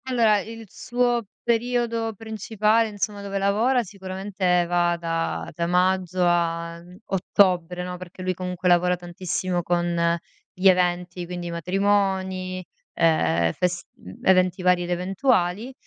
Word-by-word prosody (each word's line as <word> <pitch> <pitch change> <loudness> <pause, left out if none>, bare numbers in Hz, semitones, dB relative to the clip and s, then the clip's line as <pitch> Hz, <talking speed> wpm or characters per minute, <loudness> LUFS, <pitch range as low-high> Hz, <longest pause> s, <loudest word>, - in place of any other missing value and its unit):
Allora 230 -5 +3
il 225 +2 -8
suo 240 +2 -1 0.2
periodo 235 -1 0
principale 220 +1 0
insomma 205 0 -3
dove 200 0 -4
lavora 220 +6 +2
sicuramente 190 -2 -1
va 175 0 +1
da 165 -1 -2
da 170 -1 -2
maggio 180 0 +1
a, 170 -1 0
mhmm, 180 +1 -15
ottobre, 180 -2 +1
no. 180 0 -5
Perché 185 0 -10
lui 185 0 0
comunque 180 0 -4
lavora 180 0 +4
tantissimo 175 0 -3
con 170 -1 +1 0.4
gli 185 +2 +2
eventi, 180 -1 +2
quindi 175 -1 -5
matrimoni, 190 0 0 0.3
ehm, 85 - +2
fest 180 -1 -1 0.4
eventi 185 0 +3
vari 180 -1 +3
ed 175 - -6
eventuali. 190 +3 0
185 Hz, 125 wpm, -24 LUFS, 175-205 Hz, 0.4 s, lavora